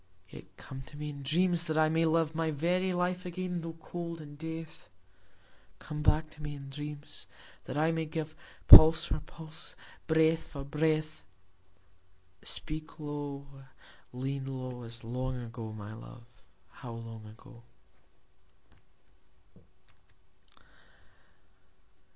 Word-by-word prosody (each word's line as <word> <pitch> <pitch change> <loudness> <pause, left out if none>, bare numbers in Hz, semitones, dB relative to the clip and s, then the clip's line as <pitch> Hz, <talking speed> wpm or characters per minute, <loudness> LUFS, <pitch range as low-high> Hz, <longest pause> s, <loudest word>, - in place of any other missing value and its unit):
Yet - - -11
come 135 0 -8
to 150 - -11
me 150 0 -4
in 140 -1 -8
dreams, 170 +4 +3
that 155 -1 -1
I 155 0 +5
may 160 +1 +2
live 160 -1 +2
My 160 0 0
very 175 +5 +1
life 180 0 0
again 180 0 -3
tho' 165 0 -5
cold 170 +1 -5
in 145 -2 -10
death: 160 - -7 0.9
Come 150 -1 -5
back 155 +1 +3
to 155 - -14
me 150 -1 -4
in 140 -1 -9
dreams, 150 +1 -7 0.4
that - - -4
I 160 +2 +3
may 160 -1 -1
give 155 0 -4 0.3
Pulse 160 +1 +11
for - - -1
pulse, 160 -1 -7 0.3
breath 160 0 +4
for 140 -2 -7
breath: 155 +1 0 1.2
Speak 155 +1 -3
low, 145 -2 -4 0.7
lean 135 +2 -3
low, 130 -2 -5
As 115 0 -8
long 125 +2 -2
ago, 115 -2 -6
my 105 0 -7
love, 115 +1 -11 0.4
how 120 - -9
long 115 -1 -8
ago. 115 +2 -14
155 Hz, 125 wpm, -31 LUFS, 135-160 Hz, 1.2 s, Pulse